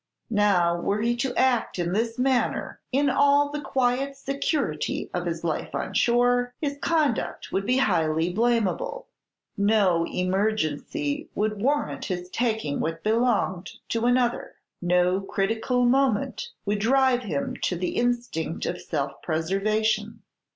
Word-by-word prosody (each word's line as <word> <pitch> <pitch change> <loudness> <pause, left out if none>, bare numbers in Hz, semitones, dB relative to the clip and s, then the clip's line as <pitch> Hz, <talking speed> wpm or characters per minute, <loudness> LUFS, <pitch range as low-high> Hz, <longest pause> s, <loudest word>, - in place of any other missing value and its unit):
Now, 185 -5 +3
were 205 +1 0
he 240 +1 +2
to 255 +2 -2
act 255 -6 +2
in 175 0 -1
this 225 +3 -1
manner 255 -1 0
in 280 +2 +2
all 285 +1 +4
the 295 0 -4
quiet 270 0 0
security 275 - -2
of 175 0 -2
his 165 -1 -3
life 165 -2 -2
on - - -3
shore, 245 +1 +2
his 285 -2 -3
conduct 305 -8 0
would 195 +1 -1
be 250 +1 +3
highly 165 -7 +1
blamable. 240 - 0 0.5
No 200 -5 +3
emergency 180 -7 -1
would 215 -1 -1
warrant 290 +5 0
his 180 -2 -4
taking 220 -11 -1
what 165 +1 -3
belonged 215 -5 +1 0.2
to 230 +1 0
another, 245 -1 +1 0.3
no 180 +1 +2
critical 225 +6 0
moment 265 - +1 0.2
would 205 0 0
drive 255 +2 +3
him 160 - -3
to 180 - 0
the 180 +1 -2
instinct 240 -10 -1
of 175 - -3
self 140 -3 -3
preservation. 215 +6 -1
220 Hz, 135 wpm, -25 LUFS, 180-250 Hz, 0.5 s, all